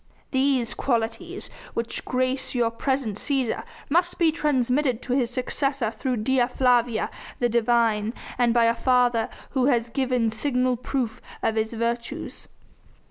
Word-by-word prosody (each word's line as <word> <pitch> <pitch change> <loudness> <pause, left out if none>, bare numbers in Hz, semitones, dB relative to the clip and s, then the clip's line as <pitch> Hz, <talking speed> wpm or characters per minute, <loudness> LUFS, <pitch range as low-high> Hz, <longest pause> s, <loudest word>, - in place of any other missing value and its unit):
These 260 -3 +2
qualities, 255 - -2 0.3
which 230 0 -2
grace 255 +1 -1
your 235 -2 +2
present 235 -3 -1
Cæsar, 265 -1 0 0.2
must 350 +4 +1
be 335 -3 +4
transmitted 265 -4 +1
to 250 - -2
his 250 -3 +2
successor 255 -1 -1
through 250 +1 -2
Dea 255 0 +3
Flavia, 245 -3 +2 0.3
the 240 - +1
divine, 230 -1 +2 0.2
and 240 -1 +4
by 235 0 +4
a 230 - +4
father 245 -1 +2 0.2
who 260 -1 +2
has 240 -4 +2
given 250 -3 +1
signal 250 +2 +1
proof 245 -1 -3 0.2
of 225 - +2
his 220 +1 -1
virtues. 235 +1 -3
245 Hz, 135 wpm, -25 LUFS, 230-265 Hz, 0.3 s, be